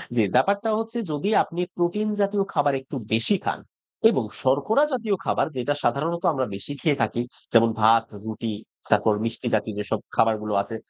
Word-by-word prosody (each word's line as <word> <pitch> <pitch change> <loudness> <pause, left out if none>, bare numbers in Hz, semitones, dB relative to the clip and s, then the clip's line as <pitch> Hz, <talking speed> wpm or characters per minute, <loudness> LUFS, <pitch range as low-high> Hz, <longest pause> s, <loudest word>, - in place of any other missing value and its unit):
জি, 115 - +4
ব্যাপারটা 200 - +2
হচ্ছে 225 +1 -4
যদি 150 +7 -1
আপনি 170 +1 -5
প্রোটিনজাতীয় 205 +2 0
খাবার 145 -3 +2
একটু 135 +2 -9 0.2
বেশি 115 - +3
খান - - -2 0.5
এবং 130 - +1 0.2
শর্করাজাতীয় 220 - +2
খাবার - - +1
যেটা 145 +4 0
সাধারণত 160 +7 0
আমরা 130 -2 0
বেশি 120 +9 -6
খেয়ে 150 -5 +1
থাকি, 120 +1 0 0.3
যেমন 115 0 +6
ভাত, 115 +1 +6 0.2
রুটি, 110 0 -4 0.4
তারপর 105 +1 +4
মিষ্টিজাতীয় 110 -2 -2
যেসব 105 - -2 0.2
খাবারগুলো 105 -2 +1
আছে, 115 - -6
140 Hz, 150 wpm, -24 LUFS, -, 0.5 s, যেমন